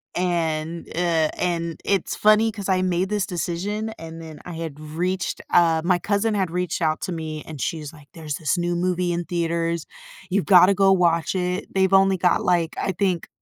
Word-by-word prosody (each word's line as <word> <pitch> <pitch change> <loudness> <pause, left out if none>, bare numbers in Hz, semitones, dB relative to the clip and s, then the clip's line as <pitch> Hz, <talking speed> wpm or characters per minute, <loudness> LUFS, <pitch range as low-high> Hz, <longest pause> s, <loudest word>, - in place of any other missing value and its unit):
and, 165 -2 -1
uh, 165 -2 +1
and 170 -2 -2
it's 195 -3 0
funny, 215 +1 +4
'cause 200 -3 -6
I 185 -1 +2
made 185 +1 0
this 210 -3 0
decision, 190 +5 -3
and 165 0 -9
then 160 -2 -10
I 180 - -8
had 160 -3 -6
reached 175 +4 -3
uh, 165 -2 +4
my 180 -1 +3
cousin 210 +3 0
had 190 -4 0
reached 180 0 -2
out 155 -1 +1
to - - -3
me, 155 -2 -5
and 150 -4 -8
she 160 +8 -2
was 150 0 -8
like, 150 -3 -16
"There's 155 -3 -5
this 160 +2 -1
new 175 0 -1
movie 180 0 0
in 170 0 -2
theaters. 170 -1 -1 0.4
You've 195 +1 0
gotta 185 0 +7
go 195 0 +4
watch 170 -2 +2
it. 180 0 -2
They've 190 0 +2
only 195 0 +5
got, 180 -1 +2
like, 170 -2 +1
I 195 - 0
think" 185 -2 -1
175 Hz, 195 wpm, -23 LUFS, 165-185 Hz, 0.4 s, gotta